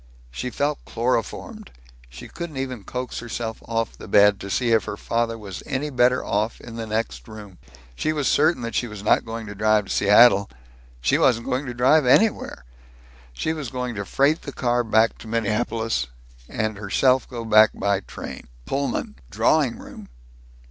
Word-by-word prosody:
She 125 - -4
felt 145 +3 -2
chloroformed. 115 -1 -3 0.4
She - - -10
couldn't 170 -5 -7
even 130 -6 -4
coax 125 -1 -5
herself 115 -1 -5
off 115 -1 -2
the - - -11
bed, 105 0 +5
to 100 - -7
see 120 +4 0
if 110 -2 +3
her 100 - -5
father 115 +1 -1
was 100 -4 -8
any 145 +2 -2
better 125 0 +2
off 105 +3 -1
in 115 - -10
the 115 -1 -5
next 110 +1 -3
room. 105 -4 -11 0.4
She 155 - -1
was 150 -3 -1
certain 155 -3 +2
that 115 - -4
she 120 - 0
was 105 -2 -9
not - - +3
going 115 0 -6
to 105 - -7
drive 105 0 +2
to - - -8
Seattle. 100 0 +5 0.5
She 65 - +2
wasn't 115 -3 +3
going 130 +2 -2
to 120 - -5
drive 130 +3 +4
anywhere! 205 - +2 0.7
She 155 - -2
was 150 -6 -5
going 125 -1 -4
to 100 -2 -4
freight 140 - +1
the 140 - -7
car 120 -1 0
back 110 0 +2
to - - -11
Minneapolis, 115 - -1 0.4
and 110 -1 -2
herself 130 +5 +2
go 120 -2 -6
back 110 -1 +6
by 100 -1 0
train - - -9 0.2
Pullman! 135 - -2
drawing - - +2
room! - - -12
115 Hz, 175 wpm, -23 LUFS, 105-125 Hz, 0.7 s, back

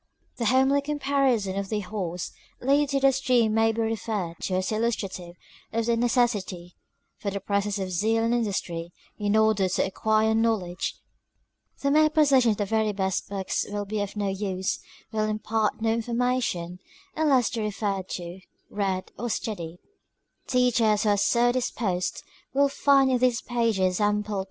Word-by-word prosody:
The 235 - -2
homely 265 +4 +4
comparison 275 -9 0
of 195 -1 -5
the 215 -1 -1
horse 180 -3 -4 0.3
lead 280 +2 +2
to 275 0 +1
the 275 0 +5
stream 250 -4 +2
may 225 0 +3
be 225 +1 -2
referred 215 -6 -2
to 185 - -2
as 185 +2 -1
illustrative 195 -6 -2 0.4
of 230 0 -1
the 235 0 +2
neces 240 +1 +3
sity 180 -3 -7 0.5
for 200 - -2
the 200 0 -3
presence 200 +1 -1
of 190 -1 -3
zeal 220 +5 +1
and 230 +1 +1
industry, 175 -7 -2 0.3
in 205 0 0
ordet 215 -4 +3
to - - +2
acquire 220 +3 +1
knowledge:— 220 -6 0 0.9
the 280 - +2
mere 310 +1 +5
possession 280 -6 +4
of 210 - +1
the 205 - 0
very 220 +1 +1
best 190 -1 -2
books 195 -2 -2
will 205 0 -3
be 210 +1 -2
of 205 0 -4
no 205 -1 -1
use, 190 -1 -2 0.2
— - - -26
will 215 -1 0
impart 215 +1 -1
no 225 - +2
information, 230 -7 -1 0.4
unless 280 -6 +3
they 230 - -3
be - - -1
referred 200 -2 -2
to, 175 +1 -6 0.3
read, 195 -2 -2
or 240 +2 -2
studied. 175 -7 -4 0.7
Teachers 235 -4 +3
who 215 - +2
are 205 - +4
so 240 +4 +3
disposed, 205 -7 -2 0.3
will 280 0 +4
find 275 -1 +4
in 250 - +2
these 245 -2 +2
pages, 215 -6 +1
ample 210 0 0
oppor. - - 0
215 Hz, 170 wpm, -26 LUFS, 195-240 Hz, 0.9 s, the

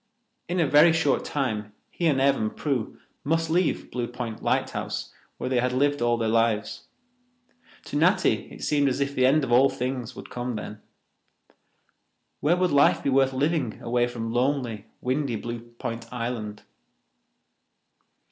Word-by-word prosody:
In 180 +1 0
a 165 - +4
very 150 +4 +6
short 160 -4 +1
time 110 -7 -2 0.2
he 170 - -1
and 140 -4 +2
Ev 135 +1 +4
and 110 -3 -3
Prue 135 -7 -2 0.3
must 165 +2 0
leave 175 0 0
Blue 120 -1 -2
Point 120 -2 -6
lighthouse, - - -2 0.2
where - - -4
they 130 -1 +1
had 125 +1 0
lived 145 +2 +1
all 120 0 +2
their 115 -1 -1
lives. 115 -1 0 1.0
To - - -7
Natty 180 +5 +2
it - - -10
seemed 145 -2 +2
as 130 - -2
if 140 0 -1
the 130 -2 +3
end 145 +3 +3
of 125 - -3
all 130 +3 +6
things 125 -1 -4
would - - -10
come 125 -1 -3
then. 105 0 -7 1.6
Where 165 +5 +2
would 180 -1 +1
life 145 0 +4
be 140 - +1
worth 135 0 +4
living 135 -3 -1
away 120 +1 +1
from 115 -2 -5
lonely, 120 -4 -1
windy 130 -1 -1
Blue 120 +2 -5
Point 115 0 -7
Island? 115 -4 -4
125 Hz, 160 wpm, -26 LUFS, 115-145 Hz, 1.6 s, very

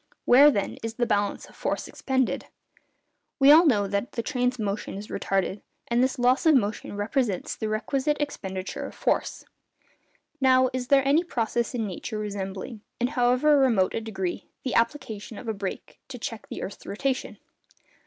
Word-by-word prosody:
Where, 280 +4 +8
then, 205 -9 -2
is 225 0 -5
the 240 - +1
balance 205 -2 0
of - - -18
force - - -2
expended? 260 -1 -1 0.9
We 275 +1 +8
all 325 +3 +8
know 210 -8 +3
that 200 +4 -2
the 230 - -2
train's 250 -2 0
motion 210 -3 -3
is 205 +2 -8
retarded, 195 +1 -1 0.3
and 235 +1 +2
this 260 +2 0
loss 255 +6 +3
of 315 - +7
motion 210 -3 -1
represents 205 -2 -1
the 220 - -3
requisite 275 +7 0
expenditure 190 -10 -4
of - - -12
force. - - -1 1.0
Now, 260 -1 +4
is 255 -1 -3
there 275 0 +4
any 300 +5 +4
process 235 -5 -1
in 225 -2 -1
nature 210 +3 -5
resembling, 205 +1 -5 0.2
in 245 +1 +1
however 260 +2 +3
remote 230 -9 +3
a - - -2
degree, 190 -5 -4 0.2
the 255 - -2
application 230 -3 -1
of 245 - -9
a 220 - 0
brake 200 -2 -6
to 250 - -8
check 225 -2 -6
the - - -5
earth's 195 - -7
rotation? 265 +5 -2
235 Hz, 170 wpm, -26 LUFS, 205-265 Hz, 1.0 s, Where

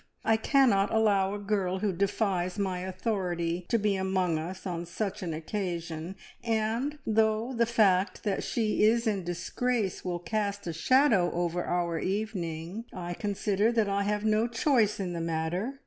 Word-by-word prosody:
I 225 - +4
cannot 220 -4 +3
allow 205 -3 +2
a - - -3
girl 200 -2 -1
who 200 0 0
defies 190 -1 0
my 190 -3 -1
authority 180 -3 -2
to 230 - +3
be 210 -2 +1
among 190 -3 0
us 180 +5 -6
on 175 -2 -3
such 195 +3 -3
an 175 -3 -3
occasion, 170 0 -4 0.3
and 230 +6 0
though 220 +2 +1
the 235 -1 +2
fact 200 -5 +2
that 205 -3 -1
she 220 -3 0
is 230 +2 +4
in 205 -4 0
disgrace 195 +5 -2
will 175 -1 -2
cast 200 +2 -2
a 170 - -3
shadow 215 - +3
over 175 0 -1
our 170 -2 -1
evening, 190 -1 -3
I 175 -1 -5
consider 205 +2 0
that 225 -3 +2
I 200 0 0
have 210 +1 -1
no 215 +1 +3
choice 230 -3 +2
in 180 -3 -2
the 170 - -3
matter. 170 +10 -2
195 Hz, 165 wpm, -29 LUFS, 175-220 Hz, 0.3 s, I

